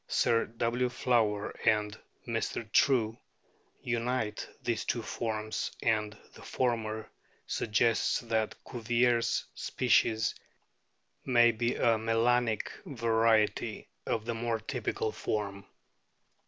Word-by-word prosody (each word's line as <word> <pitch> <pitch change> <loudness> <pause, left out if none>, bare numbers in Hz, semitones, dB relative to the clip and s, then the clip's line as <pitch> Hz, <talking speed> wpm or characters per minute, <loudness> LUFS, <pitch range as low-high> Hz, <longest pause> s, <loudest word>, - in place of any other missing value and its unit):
Sir 115 0 +2
W. 120 +2 -1
Flower 110 -5 +1
and 105 -1 +2 0.3
Mr. 115 -1 -2
True 115 -4 +3 0.6
unite 120 -2 -2
these 115 -3 -1
two 120 - -2
forms, 110 -1 -3
and 105 -2 +1 0.2
the - - -14
former 110 -3 -1 0.4
suggests 115 +1 +1
that 110 -2 -1
Cuvier's 120 0 +1
"species" 110 0 +2 0.9
may 120 -2 +5
be 115 +1 -1
a 115 -2 +3
melanic 115 0 +1
variety 115 -3 +1 0.2
of 110 -1 -1
the 120 - -1
more 115 0 -1
typical 110 -1 -2
form. 100 -3 -3
115 Hz, 100 wpm, -30 LUFS, 110-120 Hz, 0.9 s, may